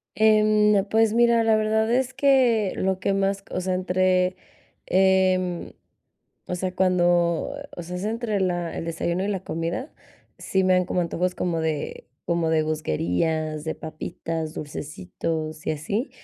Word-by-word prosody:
Em, 215 -2 +4
pues 220 +1 +2
mira, 235 -1 +4
la 220 -1 +4
verdad 220 +1 +1
es 260 +1 +1
que 250 -7 +3
lo 190 0 0
que 195 - 0
más 195 0 0
co - - -10
o 185 - 0
sea, 185 0 -1
entre, 185 0 +1 0.5
em, 185 -1 +2 0.7
o 180 - -2
sea, 185 +1 -2
cuando, 175 - +2 0.2
o 175 - -6
sea, 180 +2 -6
es 185 - -5
entre 220 -2 -1
la 175 -2 -1
el - - -4
desayuno 170 +2 -2
y - - -1
la 195 -2 -2
comida, 170 - -4 0.4
sí 190 -1 0
me 185 0 +4
dan 180 -1 +3
como 180 - 0
antojos 180 +2 -1
como 170 -2 -1
de, 155 -2 -3 0.2
como 170 -2 0
de 160 -1 +3
gusguerías, 155 - -1
de 160 - -2
papitas, 160 0 -5
dulcecitos 155 - -5
y - - +2
así, 200 - -2
185 Hz, 160 wpm, -24 LUFS, 165-210 Hz, 0.7 s, Em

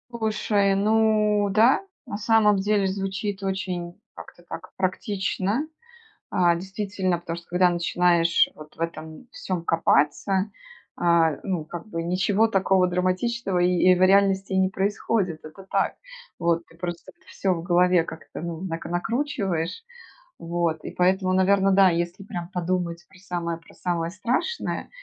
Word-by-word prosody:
Слушай, 210 -3 +1
ну 210 0 +3
да, 225 - +4 0.2
на 205 -4 -5
самом 215 -2 +4
деле 200 0 +1
звучит 195 +1 -3
очень 185 -2 -4 0.2
как-то 175 - -12
так 175 +3 -8
практично, 200 +6 -1 0.6
а, 175 -1 +3
действительно, 190 -1 -2
потому 165 -1 -5
что 170 0 -11
когда 180 0 +4
начинаешь 175 -1 +3
вот 155 0 -13
в - - -22
этом 165 +5 -6
всём 180 -3 -4
копаться, 165 +5 +2 0.5
а, 170 -2 +3
ну, 180 -5 -2
как 170 +1 -8
бы 165 -4 -3
ничего 190 +5 +2
такого 190 -3 +2
драматичного 185 +3 0
и 180 +1 +4
и - - +6
в 180 - -2
реальности 195 0 +3
не 190 0 +3
происходит. 195 -3 -1
Это 155 +5 -11
так. - - 0 0.4
Вот. 170 -1 +1 0.2
Просто 175 -1 -6 0.2
всё 190 -1 -1
в 165 - -4
голове 180 0 +3
как-то, 160 -2 -9
ну, 170 0 -5
накр 165 -3 -5
накручиваешь. 195 - -2 0.6
Вот 165 -2 -1
и - - -5
поэтому, 185 +1 +2
наверно, 195 +1 +3
да, 190 -1 +6
если 175 +3 -3
прям 175 -3 -6
подумать 175 -1 -2
про 185 - -19
самое 170 -3 -4
про 165 - -19
самое 170 -2 -2
страшное, 250 - -2
185 Hz, 140 wpm, -24 LUFS, 170-200 Hz, 0.6 s, и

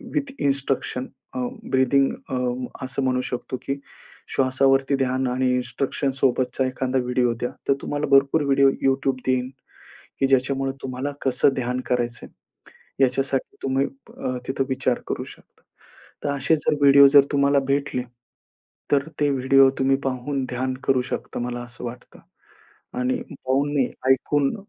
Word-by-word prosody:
With 280 -2 -1
instruction 135 -2 -1 0.3
a, - - -2 0.3
breathing 135 +1 +3 0.2
अ, 130 - -2 0.5
असं 135 +1 -2
म्हणू 130 -1 +1
शकतो 125 0 -4
की 140 +1 -3 0.6
श्वासावरती 135 +1 +3
ध्यान 130 0 0
आणि 130 +1 +1
इन्स्ट्रक्शनसोबतचा 130 +1 0
एखादा 130 0 -1
व्हिडिओ 125 -1 +1
द्या. 125 - 0 0.2
तर 140 - +5
तुम्हाला 145 0 -2
भरपूर 140 +3 +5
व्हिडिओ 135 0 +5 0.2
YouTube 135 -1 +1
देईन 130 0 +1 0.7
की 135 - +3
ज्याच्यामुळे 135 0 +1
तुम्हाला 130 +2 -3
कसं 130 +1 +3
ध्यान 125 0 -2
करायचंय 120 -1 -2 0.8
याच्यासाठी 135 +1 -1
तुम्ही 135 +1 +1
अ, 130 -1 -7
तिथं 135 0 0
विचार 130 -1 0
करू - - -3
शकता. - - -15 0.6
तर - - 0
असे 140 +4 +2
जर 150 0 0
व्हिडिओ 140 0 +8
जर 140 0 +7
तुम्हाला 140 0 +3
भेटले, 140 -2 0 0.9
तर 140 +1 +3
ते 145 - +3
व्हिडिओ 135 0 +5
तुम्ही 135 0 +3
पाहून 135 +1 -2
ध्यान 130 +1 -2
करू 130 -1 +3
शकता, - - -4
मला 120 0 -3
असं 120 0 -10
वाटतं 120 +1 -9 0.8
आणि 125 +1 0 0.3
पाहून 140 +2 +1
नाही 135 -3 +3 0.2
ऐकून. 135 - +2
135 Hz, 140 wpm, -23 LUFS, 125-140 Hz, 0.9 s, व्हिडिओ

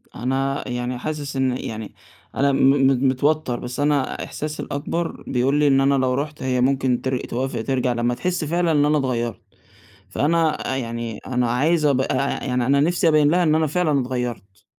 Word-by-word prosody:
أنا 135 +3 -1
يعني 125 0 -3
حاسس 145 0 -5
إن 130 -1 +1
يعني 110 -3 -6 0.4
أنا 140 0 +2
م 135 - +1 0.3
م 135 0 +2
متوتر، 135 -1 0
بس 125 +2 -6
أنا 145 -2 0
إحساسي 150 +1 -5
الأكبر 165 +4 -4
بيقول 130 +3 +1
لي 150 - +4
إن 135 -1 +4
أنا 140 +1 +3
لو 130 -1 +1
رُحت 145 +2 -4
هي 125 -1 0
ممكن 130 -1 +1
تر 130 -1 -1
توافق 130 -1 -3
ترجَع 125 0 0
لمّا 120 +1 0
تحس 175 +8 -2
فعلًا 170 +2 +1
إن 145 -2 +3
أنا 150 +1 +3
اتغيرت. 120 -4 -2 0.7
فأنا 160 - 0
يعني 115 -3 -4
أنا 125 -2 0
عايز 150 +6 +2
أبقى 135 -2 +2
آآ، 135 +2 -1
يعني 125 -2 0
أنا 140 +1 +3
نِفسي 170 +2 +2
أبيّن 150 -2 +4
لها 180 +2 +3
إن 155 -3 +3
أنا 160 0 +2
فعلًا 155 -2 +1
اتغيرت. 120 -7 -5
135 Hz, 185 wpm, -22 LUFS, 125-150 Hz, 0.7 s, لي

